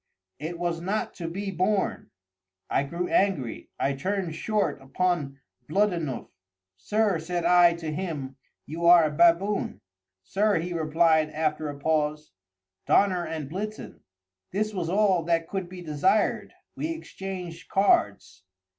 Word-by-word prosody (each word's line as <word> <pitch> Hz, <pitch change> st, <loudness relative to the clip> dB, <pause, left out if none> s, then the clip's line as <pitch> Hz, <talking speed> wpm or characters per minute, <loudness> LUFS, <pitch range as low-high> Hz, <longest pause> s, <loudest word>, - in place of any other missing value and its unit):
It 165 Hz, +3 st, -5 dB
was 170 Hz, -1 st, -2 dB
not 200 Hz, +5 st, -2 dB
to 170 Hz, -, -4 dB
be 195 Hz, +4 st, -4 dB
borne. 190 Hz, +3 st, 0 dB, 0.6 s
I -, -, +3 dB
grew 170 Hz, +5 st, -3 dB
angry. 175 Hz, -, 0 dB
I 140 Hz, -, +1 dB
turned 185 Hz, +4 st, -2 dB
short 210 Hz, -5 st, -1 dB
upon 140 Hz, 0 st, -1 dB, 0.3 s
Bluddennuff. 170 Hz, -, 0 dB, 0.5 s
"Sir!" 205 Hz, -, 0 dB
said 170 Hz, +1 st, -3 dB
I 175 Hz, -1 st, +6 dB
to 160 Hz, -2 st, -5 dB
him, 150 Hz, -7 st, -4 dB, 0.3 s
"you 170 Hz, +3 st, -2 dB
are 175 Hz, -1 st, +8 dB
a 155 Hz, -, +1 dB
baboon." 170 Hz, -, +2 dB, 0.4 s
"Sir," 205 Hz, -, +1 dB
he 175 Hz, +2 st, -3 dB
replied, 160 Hz, -1 st, +3 dB
after 155 Hz, 0 st, -1 dB
a 145 Hz, -, -6 dB
pause, 150 Hz, 0 st, -1 dB, 0.6 s
"Donner 180 Hz, +2 st, +3 dB
und 155 Hz, -3 st, -4 dB
Blitzen!" 210 Hz, +7 st, -6 dB, 0.5 s
This 215 Hz, +3 st, -1 dB
was 175 Hz, -4 st, -2 dB
all 195 Hz, -2 st, +3 dB
that 165 Hz, -1 st, +1 dB
could 190 Hz, -3 st, -4 dB
be 180 Hz, -1 st, -9 dB
desired. 185 Hz, +7 st, +1 dB, 0.2 s
We 315 Hz, -, -3 dB
exchanged 190 Hz, -, -7 dB
cards. 195 Hz, -, +1 dB
170 Hz, 135 wpm, -26 LUFS, 155-195 Hz, 0.6 s, are